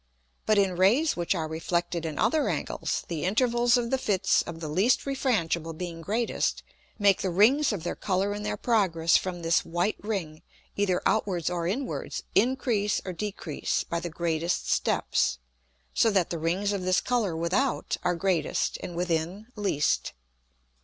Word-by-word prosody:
But 215 - +4
in 195 -2 +2
Rays 235 - +4
which 175 +2 0
are 160 -2 -2
reflected 170 +1 -2
in 155 - -5
other 310 -2 +2
Angles, - - -2
the 165 -3 -3
Intervals 240 +4 +3
of 235 -1 -2
the 265 - +1
Fits 200 -6 +2
of 165 -1 -7
the 160 - -5
least 190 +11 +2
refrangible 170 - -1
being 170 -2 -5
greatest, 220 +7 -1 0.3
make 200 -3 +3
the 190 - 0
Rings 235 - +4
of 195 -7 -4
their 175 - -3
Colour 195 +1 0
in 205 - -5
their 210 - -3
progress 180 -8 +2
from 175 -2 0
this 165 +1 +2
white 175 +5 -1
Ring, 180 -8 -4 0.3
either 190 -3 +1
outwards 185 -6 +1
or 170 -1 -1
inwards, 255 +9 -3
increase 235 -5 +2
or 185 - -4
decrease 190 -5 -3
by 170 - -3
the 175 0 -5
greatest 170 +1 -1
steps; 60 0 +1 0.6
so 225 - +4
that 190 -5 +1
the 170 - -2
Rings 185 +6 0
of 200 - -2
this 185 0 +2
Colour 220 -9 0
without 190 +11 0
are 180 0 +1
greatest, 180 -1 0
and 175 - -6
within 175 +5 -2
least. 195 -9 0
185 Hz, 165 wpm, -27 LUFS, 170-215 Hz, 0.6 s, But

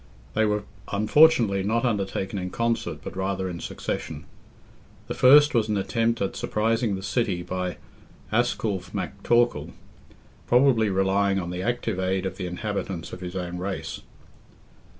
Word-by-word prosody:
They 110 - +2
were 105 -1 0 0.3
unfortunately 110 -1 +4
not 115 +5 0
undertaken 100 -3 -1
in 90 0 -4
concert, 115 +3 -1
but - - -7
rather 95 0 -1
in 85 -2 -5
succession. - - -5 0.8
The - - -4
first 145 +3 +7
was 110 -3 +2
an 105 - +1
attempt 115 +2 0
at 95 - -3
surprising 110 0 0
the 95 - -6
city 100 -6 -1
by 90 0 -3 0.5
Asculph 110 -4 0
MacTorcall, 120 0 0 0.7
probably 120 -4 +4
relying 95 +1 +2
on 90 -2 -3
the 90 +1 -4
active 120 -3 -1
aid 95 0 0
of 95 0 -4
the 95 -3 -3
inhabitants 95 -2 -4
of 90 - -7
his 90 0 -6
own 90 -1 -4
race. 95 +1 -4
100 Hz, 145 wpm, -25 LUFS, 95-115 Hz, 0.8 s, first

